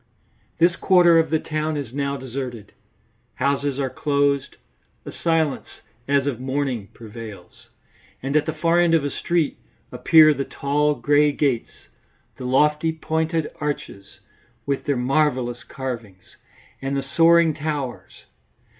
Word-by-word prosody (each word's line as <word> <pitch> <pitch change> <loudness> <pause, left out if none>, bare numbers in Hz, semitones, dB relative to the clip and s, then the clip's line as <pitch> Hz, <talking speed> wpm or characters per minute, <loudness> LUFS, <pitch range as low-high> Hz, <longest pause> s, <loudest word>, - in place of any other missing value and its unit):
This 170 +1 +3
quarter 175 -3 +5
of 160 -1 +1
the 160 - +2
town 155 0 -3
is 135 -5 -6
now 140 0 -2
deserted. 125 -5 -6 0.6
Houses 140 -1 0
are 135 -2 -1
closed; 140 -2 0 0.5
a - - -6
silence 160 -4 0 0.4
as 140 -1 +2
of 135 -5 -2
mourning 130 -5 -2
prevails. 110 -4 -11 0.6
And 135 +2 -2
at 150 -1 +2
the 155 - -1
far 165 +2 +2
end 170 -1 +4
of 160 - +2
a 145 - -2
street 170 -4 -1 0.3
appear 155 -2 +6
the 140 -1 -3
tall 145 +2 0
grey 145 +1 +3
gates, 140 -5 -2 0.5
the 130 - -7
lofty 150 +5 +2
pointed 160 0 -2
arches 140 -9 -5 0.4
with 140 -1 -2
their 140 -2 0
marvellous 125 -2 0
carvings 115 -8 -8 0.5
and 135 +1 -2
the 135 - -2
soaring 165 +4 +4
towers. 145 -4 -5
145 Hz, 135 wpm, -22 LUFS, 130-155 Hz, 0.6 s, appear